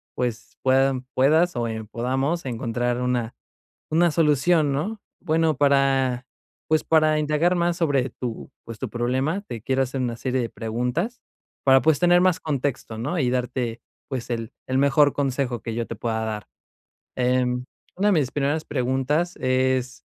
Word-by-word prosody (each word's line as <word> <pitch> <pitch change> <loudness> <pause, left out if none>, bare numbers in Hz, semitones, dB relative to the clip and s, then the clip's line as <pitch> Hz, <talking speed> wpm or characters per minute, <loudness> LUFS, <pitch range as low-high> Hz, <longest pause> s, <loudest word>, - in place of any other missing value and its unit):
pues, 120 -2 -4
puedan 130 -1 +2
puedas 155 +5 +3
o, 120 -1 -1
em, 110 -1 -5
podamos 135 +8 -1
encontrar 120 0 -2
una 125 -2 -1 0.6
una 170 +2 +4
solución, 150 0 +3
¿no? 200 +10 -2 0.2
Bueno, 160 -3 +1
para, 135 -3 +2 0.4
pues, 155 0 +2
para 155 -1 +3
indagar 155 +4 +2
más 175 0 +1
sobre 140 -6 +1
tu, 120 -1 -6
pues, 115 -1 -9
tu - - -4
problema, 130 +9 -1
te 120 - -8
quiero 135 +2 +1
hacer 130 +1 -4
una 120 -2 -1
serie 130 +2 -1
de 115 - -3
preguntas 125 - -3 0.4
para, 135 0 +6
pues, 155 -2 +3
tener 175 0 +5
más 185 -1 +3
contexto, 140 -6 -3
¿no?, 145 +10 -2
y 125 -4 +2
darte, 125 -2 -2 0.3
pues, 130 -3 -5
el 115 0 -4
el 130 0 0
mejor 140 +1 +4
consejo 135 -3 -1
que 115 -2 -5
yo 115 0 -1
te 115 - -5
pueda 110 0 -2
dar. 105 -2 -4 0.7
Em, 125 0 +1 0.3
una 205 +2 +2
de - - +4
mis 145 -7 +2
primeras 145 +2 0
preguntas 140 +6 0
es, 130 -2 0
130 Hz, 160 wpm, -24 LUFS, 125-155 Hz, 0.7 s, para